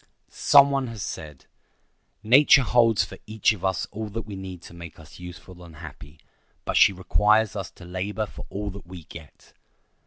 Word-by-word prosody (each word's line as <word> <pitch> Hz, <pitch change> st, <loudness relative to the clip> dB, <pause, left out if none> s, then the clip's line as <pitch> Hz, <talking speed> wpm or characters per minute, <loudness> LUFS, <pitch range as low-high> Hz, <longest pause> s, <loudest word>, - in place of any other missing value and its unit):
Some 140 Hz, -1 st, +5 dB
one 135 Hz, -2 st, -1 dB
has 115 Hz, -5 st, -6 dB
said, 75 Hz, -7 st, -8 dB, 0.8 s
"Nature 135 Hz, +4 st, +6 dB
holds 115 Hz, -3 st, +3 dB
for -, -, -12 dB
each 110 Hz, 0 st, +2 dB
of 100 Hz, -, -11 dB
us 95 Hz, -3 st, 0 dB
all 110 Hz, +1 st, -5 dB
that 115 Hz, +2 st, -5 dB
we 105 Hz, -2 st, -8 dB
need 95 Hz, -2 st, -8 dB
to -, -, -12 dB
make 85 Hz, -1 st, -11 dB
us 80 Hz, +1 st, -15 dB
useful 90 Hz, 0 st, -11 dB
and 85 Hz, -2 st, -13 dB
happy; 75 Hz, +1 st, -12 dB, 0.5 s
but -, -, -2 dB
she -, -, +6 dB
requires 105 Hz, +3 st, +2 dB
us 95 Hz, -3 st, -5 dB
to 90 Hz, -, -14 dB
labor 95 Hz, +4 st, -3 dB
for -, -, -11 dB
all 100 Hz, +1 st, -4 dB
that 100 Hz, -2 st, -11 dB
we 90 Hz, -2 st, -10 dB
get." 80 Hz, -2 st, -14 dB
95 Hz, 185 wpm, -25 LUFS, 85-110 Hz, 0.8 s, Nature